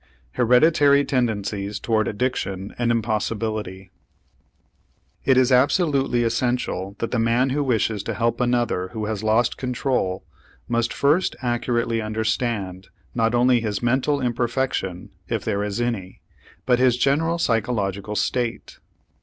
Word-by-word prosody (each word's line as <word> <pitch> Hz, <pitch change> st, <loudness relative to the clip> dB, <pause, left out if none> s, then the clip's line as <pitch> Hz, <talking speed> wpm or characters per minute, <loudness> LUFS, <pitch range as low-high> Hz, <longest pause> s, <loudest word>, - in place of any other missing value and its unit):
HEREDITARY 140 Hz, -, +4 dB
TENDENCIES 105 Hz, -5 st, -1 dB
TOWARD 110 Hz, -1 st, 0 dB
ADDICTION 100 Hz, -4 st, -3 dB
AN 120 Hz, -1 st, +1 dB
IMPOSSIBILITY 110 Hz, -4 st, -2 dB, 1.3 s
It 130 Hz, -1 st, +4 dB
is 130 Hz, 0 st, +4 dB
absolutely 135 Hz, -2 st, +2 dB
essential 115 Hz, -5 st, -1 dB
that 115 Hz, -, -3 dB
the 125 Hz, -, 0 dB
man 120 Hz, +3 st, +2 dB
who 145 Hz, +2 st, 0 dB
wishes 115 Hz, -5 st, 0 dB
to -, -, -3 dB
help 115 Hz, +2 st, 0 dB
another 120 Hz, -7 st, 0 dB
who 110 Hz, -1 st, -3 dB
has 105 Hz, -2 st, -3 dB
lost 110 Hz, +2 st, +2 dB
control 125 Hz, -7 st, -1 dB, 0.4 s
must 120 Hz, 0 st, 0 dB
first 150 Hz, +6 st, +2 dB
accurately 120 Hz, -1 st, 0 dB
understand 110 Hz, -3 st, -2 dB, 0.3 s
not 115 Hz, 0 st, +1 dB
only 125 Hz, 0 st, +4 dB
his 105 Hz, -1 st, -3 dB
mental 130 Hz, +4 st, +1 dB
imperfection, 120 Hz, -6 st, -2 dB, 0.2 s
if -, -, -2 dB
there 100 Hz, -2 st, 0 dB
is 105 Hz, +2 st, -3 dB
any, 115 Hz, -6 st, -3 dB, 0.4 s
but 125 Hz, -1 st, +3 dB
his 125 Hz, -1 st, +3 dB
general 160 Hz, +6 st, +1 dB
psychological 105 Hz, -, -1 dB
state. 120 Hz, +1 st, -2 dB
120 Hz, 125 wpm, -23 LUFS, 105-125 Hz, 1.3 s, HEREDITARY